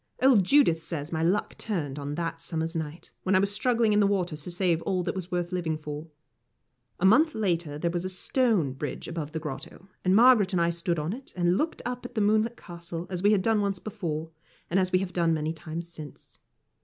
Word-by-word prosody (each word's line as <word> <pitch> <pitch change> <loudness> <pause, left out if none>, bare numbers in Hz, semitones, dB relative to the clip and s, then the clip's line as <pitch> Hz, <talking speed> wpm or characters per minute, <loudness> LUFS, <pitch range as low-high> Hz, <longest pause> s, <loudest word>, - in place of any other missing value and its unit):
Old 255 -7 +5
Judith 190 - +4
says 165 -2 -5
my 160 -1 -1
luck 180 +6 +1
turned 150 -10 -3
on 145 +1 -4
that 165 0 -3
summer's 165 0 -3
night, 160 0 -5
when 190 0 +1
I - - +6
was 200 +1 +1
struggling 230 0 +2
in 205 - +4
the 205 - +4
water 185 -5 0
to 150 +3 -5
save 175 -2 +1
all 185 -1 -1
that - - -2
was 185 -2 -5
worth 175 0 -1
living 170 -4 -1
for. 150 +1 -7 0.9
A 190 - +2
month 300 +11 +5
later 170 -8 -1
there 170 +2 -1
was 175 0 -2
a 185 - -2
stone 190 - +1
bridge 145 +2 -5
above 160 -3 -4
the 160 - -3
grotto, 155 +5 -8
and 185 +1 +3
Margaret 225 -4 +6
and 180 - +2
I 170 0 +3
stood 170 0 -1
on 155 +5 -2
it, 260 +3 -9
and 175 0 +2
looked 315 +10 -1
up 245 0 -3
at 245 0 -9
the 215 - +1
moonlit 215 +3 +2
Castle, 170 -1 -7
as 180 -1 -2
we 205 +2 +4
had 200 -3 +3
done 220 0 +2
once 200 -1 0
before, 165 -6 -4 0.4
and 185 - +3
as 185 -1 +1
we 185 - +4
have 185 -1 -3
done 165 -2 +2
many 155 +1 -2
times 165 +1 -6
since. 155 -4 -12
175 Hz, 230 wpm, -27 LUFS, 165-205 Hz, 0.9 s, I